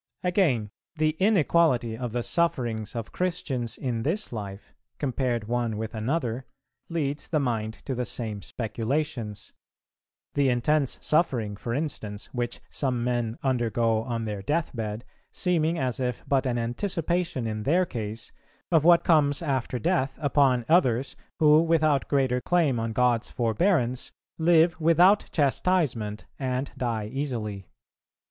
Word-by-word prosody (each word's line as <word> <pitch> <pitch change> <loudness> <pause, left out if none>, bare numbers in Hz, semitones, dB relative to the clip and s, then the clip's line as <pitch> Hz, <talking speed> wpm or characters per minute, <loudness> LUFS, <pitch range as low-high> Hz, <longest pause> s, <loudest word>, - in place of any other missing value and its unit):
Again, 160 - +1 0.2
the 155 -1 +2
inequality 165 - +3
of 120 0 -4
the 120 +1 -2
sufferings 120 - -1
of 115 -2 -5
Christians 140 -10 -2
in 120 -3 -2
this 165 - -2
life, 100 -2 -7 0.2
compared 125 -5 -1
one 120 -2 -1
with 110 +1 -4
another, 120 +1 -2 0.4
leads 150 -4 -2
the 155 - +1
mind 110 -5 -1
to 135 - -2
the 125 0 -1
same 110 -3 -3
speculations; 115 0 -3 0.8
the 140 -2 +3
intense 135 +3 +1
suffering, 125 -10 +1
for 115 +3 -4
instance, 110 -9 -4
which 120 -1 -3
some 125 -4 -1
men 120 -2 -1
undergo 115 -3 +1
on 115 0 -3
their 105 -2 -4
death 155 +7 -1
bed, 110 +1 -4 0.3
seeming 170 -2 +1
as 130 -5 -1
if 125 -5 -2
but 135 -1 +2
an 120 -1 0
anticipation 165 - -1
in 110 -1 -3
their 170 +10 +2
case 110 -5 -5 0.4
of 160 -3 +4
what 170 +1 +6
comes 150 -2 +3
after 130 -4 -1
death 130 +3 0
upon 135 -4 +3
others, 130 -6 +3 0.2
who, 155 0 +6
without 155 -4 +2
greater 130 -3 +1
claim 155 -8 +2
on 115 0 -2
God's 120 0 +2
forbearance, 125 - +1 0.3
live 165 0 +4
without 175 +6 +5
chastisement, 140 - +1
and 130 0 -2
die 115 -4 -2
easily. 110 -6 -4
125 Hz, 135 wpm, -26 LUFS, 115-155 Hz, 0.8 s, what